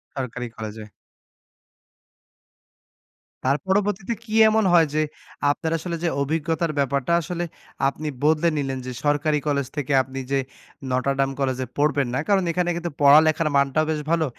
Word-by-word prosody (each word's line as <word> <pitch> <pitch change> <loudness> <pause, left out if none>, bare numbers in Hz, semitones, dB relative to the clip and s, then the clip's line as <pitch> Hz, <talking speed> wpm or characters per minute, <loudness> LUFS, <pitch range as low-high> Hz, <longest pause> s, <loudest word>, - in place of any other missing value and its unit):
সরকারি 125 -2 -4
কলেজে। 110 0 -6 2.6
তার 135 +2 +3
পরবর্তীতে 205 +2 0
কি 220 -2 -8 0.2
এমন 220 0 +2
হয়? 165 -2 +6
যে, 155 - +2 0.5
আপনার 160 +2 -3
আসলে 170 +1 -4
যে 170 - +2
অভিজ্ঞতার 160 +2 -1
ব্যাপারটা 140 +3 0
আসলে 175 +2 -4 0.4
আপনি 150 +3 -4 0.2
বদলে 155 +2 +3
নিলেন 135 -2 -2
যে, 130 - -4
সরকারি 150 +1 +2
কলেজ 140 -3 0
থেকে 145 -1 -1
আপনি 130 +1 -7
যে 140 - +2 0.5
নটরডাম 135 +1 +1
কলেজ 130 -2 0
এ - - -16
পড়বেন 145 -2 +2
না। 130 - 0
কারণ 195 -2 +3
এখানে 175 +1 0
কিন্তু 170 0 -4
পড়ালেখার 155 +2 +5
মানটাও 140 +3 +2
বেশ 155 -1 -2
ভালো 165 -1 +2
150 Hz, 145 wpm, -23 LUFS, 135-170 Hz, 2.6 s, হয়